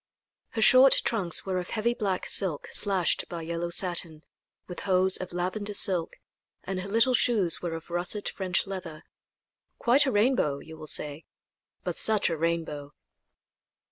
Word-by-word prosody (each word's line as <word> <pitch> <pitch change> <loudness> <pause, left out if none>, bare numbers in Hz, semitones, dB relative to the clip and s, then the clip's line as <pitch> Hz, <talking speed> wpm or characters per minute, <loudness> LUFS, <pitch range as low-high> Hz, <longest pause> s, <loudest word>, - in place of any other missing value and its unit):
Her 225 - 0
short 260 +3 +7
trunks 195 -8 0
were 185 -1 -2
of 180 - -7
heavy 230 +2 -1
black 195 -6 -3
silk 180 -7 -1
slashed 195 -4 +2
by 170 -1 -6
yellow 170 +1 -4
satin, 170 -3 -1 0.4
with 180 - -8
hose 190 -1 +3
of 185 - -7
lavender 185 +4 -3
silk; 180 -5 +1 0.5
and 190 -1 -4
her 190 +2 -6
little 230 +5 +2
shoes 210 -9 +2
were 170 -2 -4
of 165 +1 -10
russet 175 +4 -3
French 185 -2 -1
leather. 185 -5 -8 0.7
Quite 270 +5 +3
a - - +1
rainbow, 210 - +1
you 160 +3 -12
will 155 -1 -11
say 150 +1 0 0.6
but - - -4
such 215 -5 +4
a - - -1
rainbow! 160 -3 -3
185 Hz, 155 wpm, -27 LUFS, 165-210 Hz, 0.7 s, short